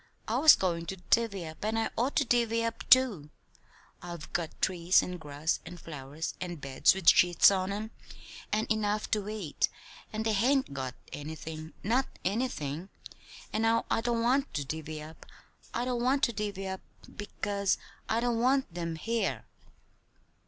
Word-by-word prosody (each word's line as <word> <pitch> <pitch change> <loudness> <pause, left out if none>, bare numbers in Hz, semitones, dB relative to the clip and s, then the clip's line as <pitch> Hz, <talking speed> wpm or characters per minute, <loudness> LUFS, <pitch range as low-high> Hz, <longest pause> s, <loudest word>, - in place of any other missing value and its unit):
I - - 0
was 310 -1 +9
goin' 170 -3 -1
to 190 - -3 0.2
divvy 210 -6 +2
up, 155 +3 -9
and 220 +1 0
I 225 - 0
ought 255 +5 0
to - - +3
divvy 230 -1 +2
up, 230 0 -5
too. 250 - +5 0.7
I've 170 -3 -8
got 165 -2 -3
trees 180 -1 +3
and 180 -1 -5
grass 150 +1 -2
and 175 - -10
flowers 150 0 -6
and 175 -3 -4
beds 135 +5 +3
with 190 -3 -6
sheets 175 +2 +7
on 190 0 0
'em 215 +2 -4 0.6
and 215 +1 +1
enough 215 -1 0
to 210 -1 0
eat, 205 -9 -1 0.4
and 220 +1 -3
they 220 - +2
hain't 255 - +2
got 130 -2 -4 0.2
anything 155 +1 -7
not 245 +6 +2 0.2
anything. 185 - -2 0.6
And 215 - 0
now 225 0 +2
I - - +2
don't 235 0 0
want 270 +4 +2
to 145 -2 -1
divvy 155 +1 -5
up, 155 +1 -12 0.5
I 240 - -1
don't 250 -1 -1
want 270 +3 +2
to 235 - +3
divvy 200 -2 -3
up, 190 0 -4 0.3
because 205 -1 -1 0.3
I 225 +1 +1
don't 240 -1 +1
want 260 -4 +2
them 170 -1 -3
here!" 230 +7 -1
200 Hz, 165 wpm, -30 LUFS, 165-230 Hz, 0.7 s, was